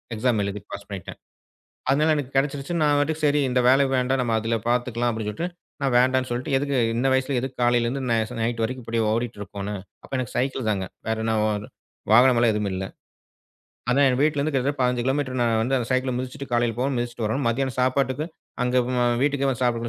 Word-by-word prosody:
Exam 115 -1 +1
எழுதி 100 0 -4
pass 100 0 -7
பண்ணிட்டேன். 95 -4 -7 0.7
அதனால 150 +4 +3
எனக்கு 140 -3 -3
கெடச்சுடுச்சு. 140 +3 0
நான் 145 -1 +4
பாட்டுக்கு, 155 +2 -1
"சரி 145 0 +3
இந்த 125 0 +2
வேலை 135 +2 +5
வேண்டாம். 130 +1 +1
நம்ம 115 -2 0
அதுல 115 +1 0
பாத்துக்கலாம்." 120 -1 +1
அப்படி 110 -1 -4
சொல்லிட்டு 165 +12 -3 0.3
நான் 135 -2 +1
வேண்டாம்ன்னு 130 0 +2
சொல்லிட்டு, 125 +3 -3
எதுக்கு 140 -1 -1 0.2
இந்த 130 +3 +1
வயசுல 130 0 +1
எதுக்கு 130 0 -5
காலையிலருந்து 120 +2 +1
ந 115 - +3
ஸ் 125 - -8
நைட்டு 115 0 -1
வரைக்கும் 125 +1 -4
இப்படி 115 0 -1
ஓடிட்டுருக்கோணும் 105 -3 -4 0.2
அப்ப - - -15
எனக்கு 125 -3 -4
சைக்கிள் 130 -2 -1
தாங்க. 95 -2 -1 0.2
வேற 110 - +1
என்னவோ 110 -1 +1
இது 105 - -10 0.4
வாகனமல்லாம் 120 -1 +6
எதுவுமே 105 -2 -1
இல்ல. 95 - -3 1.1
அதான் 140 +2 +4
என் 125 0 +1
வீட்லருந்து 145 0 +1
கிட்டத்தட்ட 135 +1 0
15 125 -1 +1
கிலோமீட்டர் 130 -1 0
நான் 115 -2 +2
வந்து 130 +3 +1
அந்த 120 - -3
சைக்கிள 130 0 +1
மிதிச்சிட்டு 130 +2 -5
காலையில 120 -1 +2
போகணும், 130 +1 0
மிதிச்சிட்டு 120 -1 -3
வரணும். 125 +4 -1
மதியானம் 130 +2 -1
சாப்பாட்டுக்கு 130 +2 +1 0.4
அங்க 125 +1 +1 0.2
ம் 125 - 0
அ - - +3 0.2
வீட்டுக்கே 140 -1 +1
வந்து 130 -1 -1
சாப்பிட 120 -1 0
125 Hz, 195 wpm, -24 LUFS, 115-135 Hz, 1.1 s, வாகனமல்லாம்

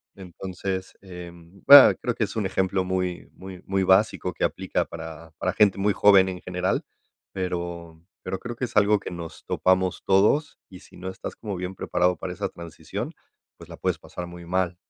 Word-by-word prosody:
entonces, 95 0 -6
em, 90 0 -12
va 145 -2 +11
creo 120 - -3
que 110 - 0
es 100 - -9
un 105 -3 -1
ejemplo 95 0 0
muy 90 -1 -3
muy 95 -1 -11
muy 95 0 0
básico 95 -1 +3
que - - -4
aplica - - -1
para 80 -1 -9
para - - -1
gente 100 -2 +3
muy 100 0 +2
joven 95 -2 +5
en 90 -1 -6
general, 90 0 -2 0.5
pero 85 -3 -5 0.2
pero 95 - -4
creo 120 -1 -7
que 125 - -1
es - - -11
algo 105 0 +4
que - - -7
nos 85 -2 -8
topamos 95 0 +1
todos, 105 +10 +2
y 90 -2 -12
si - - -17
no 95 +1 -7
estás 95 - -7
como 105 -4 -5
bien 90 +1 -5
preparado 90 0 0
para 90 -1 -5
esa - - -3
transición, 85 -1 -7 0.4
pues - - -14
la - - -9
puedes - - -1
pasar 90 -1 -8
muy 85 0 -11
mal. 90 0 -1
95 Hz, 190 wpm, -25 LUFS, 90-95 Hz, 0.5 s, va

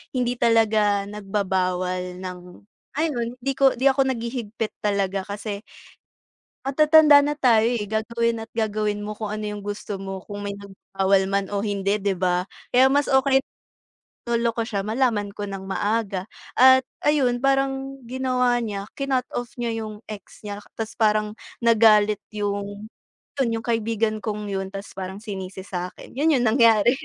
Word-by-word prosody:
hindi 245 -1 +1
talaga 215 -3 +3
nagbabawal 185 -3 -2
ng 180 -1 -5 0.6
ayun 290 -7 0 0.2
'di 275 +1 0
ko, 270 0 +4
'di 260 - -1
ako 265 0 +1
naghihigpit 230 -2 -3
talaga 200 -2 0
kasi 205 0 -5 1.1
matatanda 300 +1 +6
na 295 +1 -1
tayo 230 -4 +4
eh, 210 - -3
gagawin 230 +2 -1
at 225 - -9
gagawin 215 -2 -1
mo 210 - -4
kung 215 0 -5
ano 215 0 -4
yung 210 -1 -5
gusto 205 -1 -5
mo, 195 0 -5
kung 205 -1 -7
may 200 0 -4
nagbabawal 195 -1 0
man 200 0 +1
o 200 - 0
hindi, 200 0 -1
'di 195 -1 0
ba. 180 0 +1 0.3
Kaya 260 +2 +6
mas 285 +1 +3
okey 265 0 +4 0.9
loloko 235 -1 0
siya 200 -4 -2
malaman 220 -2 0
ko 205 0 -6
ng 195 -1 -6
maaga. 200 0 -1 0.3
At 260 0 +8 0.2
ayun 260 -5 +3
parang 270 0 0
ginawa 250 0 +1
niya 205 -4 -3 0.2
cinut-off 255 -3 -1
niya 225 -2 -3
yung 215 +1 -10
ex 210 -1 -11
niya, 205 -1 -5 0.2
'tas 225 +1 -6
parang 215 -1 +2 0.3
nagalit 215 -2 +5 0.2
yung, 205 +1 -4 0.5
yun 235 -4 +1
yung - - -15
kaibigan 225 -1 0
kong 210 -1 -4
yun, 195 0 -2
tas 195 +1 -8
parang 190 +2 -7
sinisi 190 -2 -6
sa'kin. 180 -2 -6
Yun 300 +3 +2
yung - - +1
nangyari. 230 -1 +5
215 Hz, 150 wpm, -24 LUFS, 200-245 Hz, 1.1 s, At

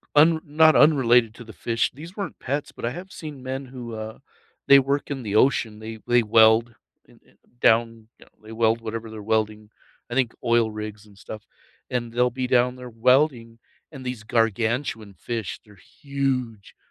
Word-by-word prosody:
un 160 +2 +5
not 155 +1 +4
unrelated 125 -6 +4
to 120 - -11
the 110 -2 -12
fish, 115 +5 -1
these 165 +7 -11
weren't 200 - -5
pets, 140 +3 -3
but - - -7
I 115 - 0
have 180 +6 -9
seen 150 -5 -9
men 130 +1 -4
who, 125 -2 -8
uh, 110 0 -7 0.5
they 140 0 +8
work 140 +2 -1
in 135 -2 -3
the 105 -2 -3
ocean, 110 -3 +2
they 110 0 -8
they 120 0 +4
weld 110 +1 +4 0.3
in - - -22
in - - -27 0.2
down, 115 -1 +2
you - - -16
know, - - -30
they 110 - -12
weld 115 0 +1
whatever 115 0 -6
they're 110 -1 -8
welding, 110 0 -1 0.4
I 120 - -5
think 130 -3 +1
oil 115 -2 +2
rigs 105 0 -7
and 100 -2 -20
stuff, 105 +2 -9 0.5
and 120 -2 -3
they'll 125 +1 +2
be 130 0 -3
down 125 0 +2
there 125 -1 -9
welding 120 0 +1 0.3
and 135 -4 -10
these 125 -3 -5
gargantuan 115 -1 -1
fish, 115 -2 -5
they're 105 -2 -18 0.2
huge, 130 -7 -3
120 Hz, 185 wpm, -24 LUFS, 110-130 Hz, 0.5 s, they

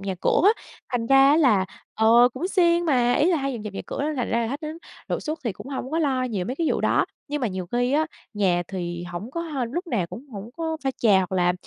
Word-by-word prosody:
nhà 195 -1 -3
cửa - - +3
á, 430 +3 +4 0.3
thành 230 -2 0
ra 270 +1 +6
á 300 - +5
là 220 -12 +4 0.3
ờ, 230 +3 +6
cũng 340 +8 -3
siêng 345 -3 +3
mà, 250 -6 +3
ý 310 +7 +3
là 340 - +3
hay 275 -1 -2
dọn 230 - -6
dẹp 210 -2 -6
nhà - - -5
cửa 275 - -4
nên 305 +1 -1
là 250 - -1
ra 230 0 0
khách 280 +4 -4
đến 310 0 -6 0.3
đột - - -1
xuất 310 +1 -3
thì 230 - 0
cũng 205 +6 -11
hông 265 -1 -5
có 320 - 0
lo 270 -5 +1
nhiều 210 -7 -2
mấy 250 +8 -4
cái 330 0 0
vụ - - 0
đó. - - +2 0.2
Nhưng 295 +1 -2
mà 250 - +1
nhiều 185 -2 -5
khi 245 +1 +1
á, 310 +2 +2 0.3
nhà 185 -4 +2
thì 175 -2 -4
hổng 175 +6 -6
có 335 - -3
h 310 -4 -5
lúc 350 +4 -3
nào 210 - -1
cũng 245 +10 -10
hổng 205 +3 -7
có 325 -1 -2
pha 270 - +2
trà 215 -7 +4
hoặc 185 0 -2
là, 180 -1 +3
250 Hz, 280 wpm, -24 LUFS, 205-305 Hz, 0.3 s, ra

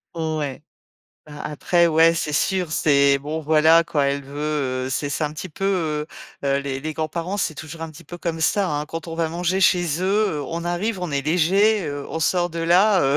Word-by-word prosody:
Ouais. 155 -4 -3 0.7
Ben 150 -1 -11
après, 170 +3 +1
ouais, 165 +1 +5
c'est 155 -3 -2
sûr 180 +1 0
c'est 140 -4 +3
bon 150 +3 -4
voilà 160 +2 +5
quoi, 145 -3 0
elle 140 0 -1
veut 140 -2 -2
heu, - - -3
c'est 140 +2 -2
c'est 155 - -1
un 150 - -3
petit 185 +4 -7
peu, 195 - -6 0.8
heu - - +1
heu, 140 0 +2
les 135 -1 -4
les 155 +2 -4
grands 155 -1 -2
parents 175 +5 -3
c'est 160 -5 -1
toujours 160 +1 -8
un 165 - -5
petit 160 +2 -14
peu 175 +4 -9
comme 165 -2 -3
ça, 195 +3 +2
hein. 150 0 -2
Quand 165 +1 -7
on 165 - -5
va 165 -1 0
manger 175 +3 -1
chez 175 -3 +2
eux, - - -1 0.3
heu, 145 - -3
on 165 +4 -4
arrive 185 +3 -2
on 180 -3 -3
est 140 -1 0
léger, 185 +6 +3
heu, 145 -1 -5
on 160 - -4
sort 175 +2 +1
de 165 0 -5
là, 185 +4 +4
heu, 135 +1 +2
160 Hz, 230 wpm, -22 LUFS, 145-175 Hz, 0.8 s, ouais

